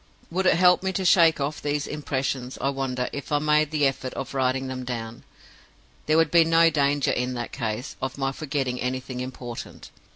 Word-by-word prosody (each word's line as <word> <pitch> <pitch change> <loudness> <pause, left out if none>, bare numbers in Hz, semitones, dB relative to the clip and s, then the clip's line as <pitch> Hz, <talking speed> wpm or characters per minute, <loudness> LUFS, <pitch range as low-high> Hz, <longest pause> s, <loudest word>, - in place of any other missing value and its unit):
"Would 185 +2 +1
it - - +5
help 180 +1 +5
me 190 0 -1
to 190 0 -2
shake 165 -3 +5
off 145 +2 -3
these 145 0 -1
impressions, 135 -3 -3
I 135 - 0
wonder, 130 -2 -2
if 140 0 -6
I 145 - +3
made 150 0 +2
the 150 -2 +1
effort 135 -1 -2
of 135 - -5
writing 130 0 0
them 130 -1 -5
down? 115 -2 -6 0.8
There 155 +1 +3
would 165 -2 +3
be 170 -1 +6
no 165 0 +4
danger, 145 -1 +2
in 125 +1 -1
that 120 -1 -4
case, 115 +1 -4
of 130 0 -3
my 135 -1 0
forgetting 135 -3 -3
anything 130 0 -3
important. 125 -2 -7
135 Hz, 195 wpm, -25 LUFS, 130-155 Hz, 0.8 s, be